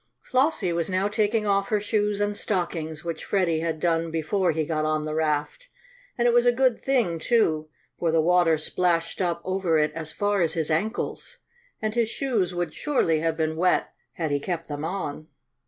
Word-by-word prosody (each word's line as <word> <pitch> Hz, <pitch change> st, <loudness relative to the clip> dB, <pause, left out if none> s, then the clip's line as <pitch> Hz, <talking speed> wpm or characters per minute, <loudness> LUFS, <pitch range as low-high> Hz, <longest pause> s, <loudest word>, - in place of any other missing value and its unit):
Flossie 255 Hz, -, +1 dB
was 170 Hz, 0 st, -1 dB
now 185 Hz, +2 st, +1 dB
taking 210 Hz, +1 st, +1 dB
off 200 Hz, -1 st, +1 dB
her 215 Hz, -, +2 dB
shoes 210 Hz, -1 st, 0 dB
and 205 Hz, 0 st, 0 dB
stockings, 170 Hz, -6 st, -2 dB
which 165 Hz, -2 st, -4 dB
Freddie 175 Hz, -5 st, +1 dB
had 160 Hz, -1 st, -2 dB
done 165 Hz, 0 st, +1 dB
before 165 Hz, +3 st, 0 dB
he 160 Hz, 0 st, -1 dB
got 155 Hz, 0 st, -1 dB
on 155 Hz, 0 st, 0 dB
the 155 Hz, 0 st, -3 dB
raft; 155 Hz, -, -1 dB, 0.5 s
and 240 Hz, 0 st, +3 dB
it 240 Hz, -, +3 dB
was 240 Hz, 0 st, +4 dB
a -, -, +7 dB
good 255 Hz, -1 st, +1 dB
thing, 235 Hz, -12 st, +1 dB
too, 155 Hz, -8 st, +1 dB, 0.3 s
for 170 Hz, -2 st, +1 dB
the 165 Hz, -, +3 dB
water 170 Hz, 0 st, +4 dB
splashed 165 Hz, +2 st, 0 dB
up 170 Hz, -2 st, -1 dB
over 185 Hz, -3 st, +1 dB
it 150 Hz, 0 st, +2 dB
as 160 Hz, 0 st, -4 dB
far 205 Hz, +1 st, 0 dB
as 165 Hz, -, +2 dB
his 160 Hz, -2 st, 0 dB
ankles, 220 Hz, -, -2 dB, 0.5 s
and 215 Hz, 0 st, 0 dB
his 230 Hz, -1 st, +1 dB
shoes 225 Hz, -9 st, -1 dB
would 175 Hz, -3 st, -3 dB
surely 170 Hz, -, +1 dB
have 165 Hz, 0 st, -1 dB
been 160 Hz, -1 st, 0 dB
wet 180 Hz, +3 st, +1 dB, 0.2 s
had 160 Hz, -3 st, -3 dB
he 145 Hz, -, +1 dB
kept 165 Hz, +2 st, -4 dB
them 145 Hz, 0 st, -5 dB
on. 155 Hz, -4 st, -4 dB
175 Hz, 195 wpm, -25 LUFS, 160-205 Hz, 0.5 s, a